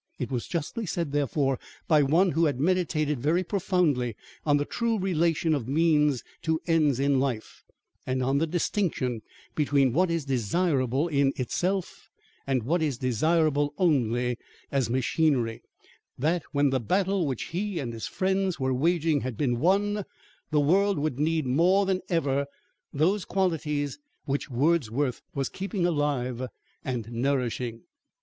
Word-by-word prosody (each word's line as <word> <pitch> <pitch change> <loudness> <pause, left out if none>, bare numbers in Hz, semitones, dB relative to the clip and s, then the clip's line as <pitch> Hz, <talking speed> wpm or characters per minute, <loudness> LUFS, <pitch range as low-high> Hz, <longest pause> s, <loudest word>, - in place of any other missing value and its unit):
It 125 -1 -4
was 125 -3 -2
justly 185 +6 -3
said, 165 -3 -2
therefore, 140 -2 0 0.3
by 155 -3 +5
one 165 +7 +3
who 165 +3 +2
had 140 -5 0
meditated 155 -4 +1
very 160 +8 +1
profoundly 170 - 0 0.3
on 145 -1 +5
the 145 - -1
true 230 +4 -1
relation 170 -4 +1
of 135 -6 -2
means 150 -3 +2 0.2
to 160 0 0
ends 155 -6 +2
in 140 -1 +2
life, 130 -5 -3 0.4
and 130 0 0
on 135 +2 +2
the 165 - +1
distinction 160 - -1 0.3
between 140 -4 +2
what 180 +5 +3
is 165 -3 -1
desirable 135 - +1
in 140 -3 +2
itself 180 +8 -2 0.4
and 130 -4 +1
what 165 +8 +1
is 145 -6 0
desirable 145 +3 +1
only 125 - +1 0.3
as 135 -5 +1
machinery, 130 -2 +1 0.6
that 165 +6 +1
when 145 -2 +2
the 130 - +1
battle 185 - +1
which 130 -4 -3
he 195 +2 -3
and 125 -6 -3
his 115 - -5
friends 190 -2 0
were 130 0 0
waging 160 +1 +1
had 125 -4 -4
been 120 -5 0
won, 205 +5 +2 0.5
the 150 - +2
world 195 +7 +3
would 145 -3 -2
need 160 0 +1
more 175 +10 +3
than 190 -1 0
ever 140 -5 +1 0.4
those 180 +7 +1
qualities 160 - -1 0.3
which 140 0 -2
Wordsworth 135 -2 +1
was 135 -2 0
keeping 195 -1 -3
alive 135 -6 -1 0.4
and 120 -4 -3
nourishing. 120 -2 -1
145 Hz, 145 wpm, -27 LUFS, 130-170 Hz, 0.6 s, by